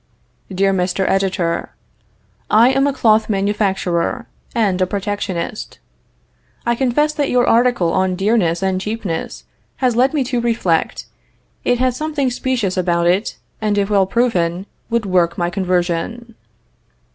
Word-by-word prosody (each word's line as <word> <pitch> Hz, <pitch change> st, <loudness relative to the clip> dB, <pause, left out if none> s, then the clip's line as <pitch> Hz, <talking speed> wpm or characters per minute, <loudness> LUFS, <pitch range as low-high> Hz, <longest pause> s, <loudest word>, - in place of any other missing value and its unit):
"DEAR 195 Hz, +1 st, +1 dB
MR. 185 Hz, +1 st, 0 dB
EDITOR: 190 Hz, -3 st, -1 dB, 0.7 s
I 230 Hz, +4 st, +6 dB
am 275 Hz, +1 st, +2 dB
a -, -, +2 dB
cloth 225 Hz, -5 st, +2 dB
manufacturer, 195 Hz, +1 st, 0 dB, 0.3 s
and 200 Hz, -5 st, +1 dB
a 185 Hz, -, +2 dB
protectionist. 200 Hz, -1 st, -4 dB, 0.9 s
I 235 Hz, -, +2 dB
confess 270 Hz, +5 st, +1 dB
that 290 Hz, -2 st, -1 dB
your 250 Hz, -1 st, +3 dB
article 235 Hz, -7 st, +3 dB
on 190 Hz, -1 st, +1 dB
dearness 195 Hz, -3 st, +1 dB
and 190 Hz, -1 st, 0 dB
cheapness 205 Hz, -6 st, -4 dB, 0.3 s
has 250 Hz, -3 st, 0 dB
led 260 Hz, +5 st, +2 dB
me 285 Hz, -, +2 dB
to 250 Hz, -1 st, -2 dB
reflect. 225 Hz, -9 st, 0 dB, 0.6 s
It 245 Hz, -, +2 dB
has 255 Hz, 0 st, +1 dB
something 295 Hz, -3 st, -1 dB
specious 240 Hz, -7 st, -1 dB
about 170 Hz, -1 st, +1 dB
it, 185 Hz, +5 st, +1 dB, 0.2 s
and 210 Hz, -1 st, 0 dB
if 200 Hz, +1 st, 0 dB
well 195 Hz, -2 st, +3 dB
proven, 190 Hz, -6 st, 0 dB, 0.2 s
would 230 Hz, -2 st, 0 dB
work 175 Hz, -3 st, +1 dB
my 175 Hz, 0 st, -1 dB
conversion." 185 Hz, +5 st, -2 dB
205 Hz, 135 wpm, -18 LUFS, 185-240 Hz, 0.9 s, I